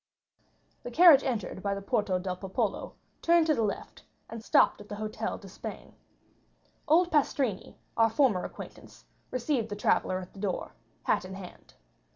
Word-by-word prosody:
50235m - - -43
The - - -6
carriage 320 -1 +8
entered 225 -8 -3
by 200 0 -1
the 200 - -5
Porta 210 -5 0
del 180 0 -3
Popolo, 195 +3 -3 0.3
turned 340 -1 +4
to 315 - +3
the 235 - 0
left, 210 -2 -4 0.3
and 225 -1 -7
stopped - - +3
at 205 - -14
the 205 - -5
Hôtel 215 +1 -4
d'Espagne. 195 -1 -9 0.9
Old 340 +3 +4
Pastrini, 270 -8 0 0.2
our 225 0 +4
former 225 -7 +2
acquaintance, - - -10 0.2
received 250 -2 -1
the 205 - -4
traveller 185 -2 +1
at 185 -1 -8
the 195 - -12
door, 195 -3 -3 0.3
hat - - +1
in 190 +1 -8
hand. 185 -2 -12
215 Hz, 165 wpm, -29 LUFS, 195-265 Hz, 0.9 s, carriage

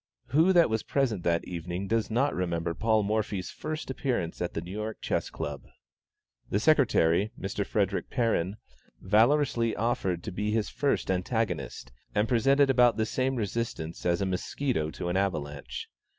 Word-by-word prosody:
Who 160 +8 +4
that 170 -2 +6
was 110 -1 0
present 125 -9 0
that 85 -1 +1
evening 90 +2 -4
does 110 0 0
not 130 +6 +1
remember 85 -2 -1
Paul 110 +2 +2
Morphy's 105 -2 -1
first 155 -3 -5
appearance 125 -11 -2
at 90 - -3
the - - -1
New 90 - -9
York 105 +2 -4
Chess - - -1
Club? 70 -2 -6 0.8
The 100 - +1
secretary, 110 - +3
Mr. - - -2
Frederick - - -1
Perrin, 105 -5 0 0.4
valorously 115 +3 +3
offered 95 -6 -1
to - - -5
be 105 +3 -2
his 110 0 0
first 140 -8 0
antagonist, 95 - -2 0.2
and 105 +2 +2
presented 135 +4 +4
about 120 -3 +4
the 110 - +1
same 130 +4 0
resistance 105 -7 -3
as 85 +2 +1
a - - +1
musquito 95 - -1
to 85 - -5
an 90 - 0
avalanche. 75 -7 -3
110 Hz, 160 wpm, -28 LUFS, 90-120 Hz, 0.8 s, that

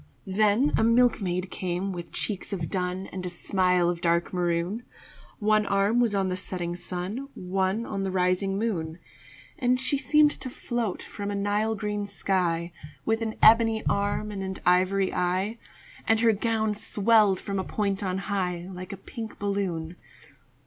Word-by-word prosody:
Then 215 +8 +2
a - - +3
milkmaid 215 -6 +2
came 185 +2 -2
with 175 -2 -7
cheeks 205 -2 -3
of 170 -6 -3
dun 185 0 -2
And 185 -1 -5
a 180 - -3
smile 180 0 +1
of 175 -1 -1
dark 170 +1 +1
maroon, 175 +4 0 0.6
One 215 -1 +2
arm 200 +4 +2
was 230 -4 +2
on 195 -1 +1
the 185 0 -2
setting 175 -2 -4
sun, 180 +9 -4
One 190 +4 -1
on 195 -2 -3
the 190 - -1
rising 185 +1 +1
moon. 170 -8 -2 0.6
And 250 -1 +2
she 275 +1 +1
seemed 295 +2 +4
to 260 - -5
float 240 -5 -3
from 205 -1 -6
a 205 - -2
Nile 205 +2 0
green 210 0 -3
sky, 180 -4 0 0.3
With 225 0 +1
an 220 -1 -2
ebony 225 0 +6
arm 205 +1 0
and 200 -2 -5
an 190 0 -4
ivory 185 +2 +3
eye, 185 +5 0 0.5
And 225 0 +4
her 230 -1 +5
gown 220 0 0
swelled 210 -1 +3
from 200 -1 -3
a - - -1
point 200 0 -1
on 185 -2 -1
high, 185 -3 -2
Like 185 0 -7
a 200 - -6
pink 220 +3 -8
balloon. 180 -5 -2
195 Hz, 165 wpm, -27 LUFS, 180-220 Hz, 0.6 s, ebony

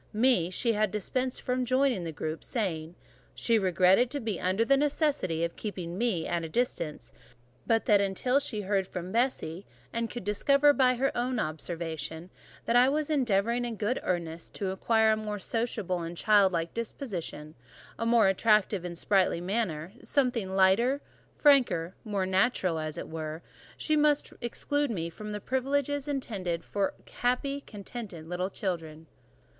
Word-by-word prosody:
Me, 215 -6 +3
she 230 +5 0
had 215 -1 +1
dispensed 250 +6 -2
from 250 0 0
joining 255 -5 +2
the 165 - -4
group; 155 +1 -5
saying, 175 -8 -3 0.4
"She 230 -2 +2
regretted 190 +5 +4
to 285 - -3
be 220 -7 -3
under 190 +5 +1
the 275 - +5
necessity 280 - +1
of 170 - -2
keeping 180 -5 -5
me 205 -6 0
at 170 -1 -1
a 165 - -5
distance; 155 - -2 0.5
but 225 -1 +2
that 205 -1 +5
until 200 +7 +1
she 220 -7 -3
heard 195 -1 0
from 180 0 -6
Bessie, 220 -7 -1 0.3
and 230 0 -1
could 240 - -6
discover 280 +8 +4
by 255 -2 +4
her 270 +3 0
own 245 +1 -1
observation, 160 0 -4 0.3
that 230 - +1
I 250 +2 +6
was 300 +2 -1
endeavouring 235 -3 +1
in 240 -2 -3
good 215 +4 -1
earnest 170 -2 -3
to 195 -2 -2
acquire 220 +3 +3
a - - +3
more 210 -1 -4
sociable 215 -4 -2
and 170 +1 -6
childlike 190 -6 +3
disposition, 195 - -5 0.5
a - - -1
more 230 -3 +5
attractive 205 -1 +3
and 175 -1 -5
sprightly 190 -2 +2
manner—something 195 - -1
lighter, 200 +9 +4 0.4
franker, 245 - +4
more 205 -4 -1
natural, 185 -3 +1
as 155 +1 -4
it - - -5
were—she 160 - -6
really 300 - +4
must 295 -1 +2
exclude 290 +4 -1
me 170 -6 -3
from 210 +3 -6
privileges 280 +3 -1
intended 200 - -2
only - - -25
for 200 -1 0
contented, 275 +3 -2 0.5
happy, 160 - -13
little 180 +2 -2
children." 165 -5 -4
210 Hz, 155 wpm, -29 LUFS, 175-245 Hz, 0.5 s, I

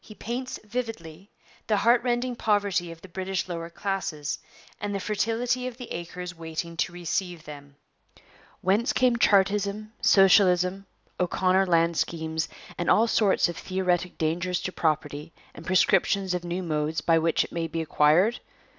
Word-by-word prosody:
He 215 - -13
paints 250 +4 -5
vividly 205 -6 -6 0.4
the 215 -2 +2
heart 235 +4 +4
rending 245 0 -1
poverty 200 -6 0
of 165 0 -12
the - - -10
British 190 +1 -3
lower 170 -1 -5
classes, 185 -5 -3 0.4
and 205 0 -3
the - - -1
fertility 230 +5 -1
of 245 -2 -7
the 250 -2 -9
acres 175 +1 -6
waiting 165 +1 -5
to 170 - 0
receive 175 0 -3
them. 145 -1 -11 0.9
'Whence 205 +6 +2
come 250 -2 +3
Chartism, 205 +1 +2
Socialism, 190 -1 +4 0.3
O'Connor 185 +1 +2
land 170 -1 +2
schemes, 160 -1 -2 0.3
and 175 - -1
all 225 - +5
sorts 215 -5 +3
of 175 - -5
theoretic 180 -1 -1
dangers 175 +3 -1
to 185 - -3
property, 155 -1 -2 0.2
and 165 - -12
prescriptions 190 0 +2
of 180 -1 -2
new 175 +2 -3
modes 155 -1 -1
by 165 +1 +3
which 165 0 +2
it - - -10
may 165 -1 -2
be 165 +1 -4
acquired? 160 +8 +3
185 Hz, 155 wpm, -26 LUFS, 165-205 Hz, 0.9 s, all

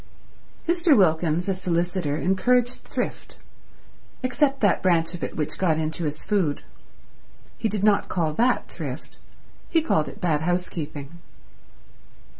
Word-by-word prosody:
Mr. 340 -4 +4
Wilkins, 165 -2 +2
a 195 - +2
solicitor, 175 -4 -1
encouraged 245 +8 +2
thrift, - - -5 0.9
except 270 +2 +1
that 205 -4 +3
branch 170 -2 +2
of 175 - -6
it - - -4
which 150 -2 -3
got 165 -5 +2
into 160 +2 -2
his 150 0 -4
food. 185 -9 0 1.0
He 225 - 0
did 210 -2 -2
not 210 -1 +3
call 160 -4 0
that 245 +9 +2
thrift, - - -7 0.5
he 335 - +4
called 155 - +1
it 135 - -9
bad 165 -6 +1
housekeeping. 165 -3 -3
180 Hz, 130 wpm, -24 LUFS, 160-210 Hz, 1.0 s, Mr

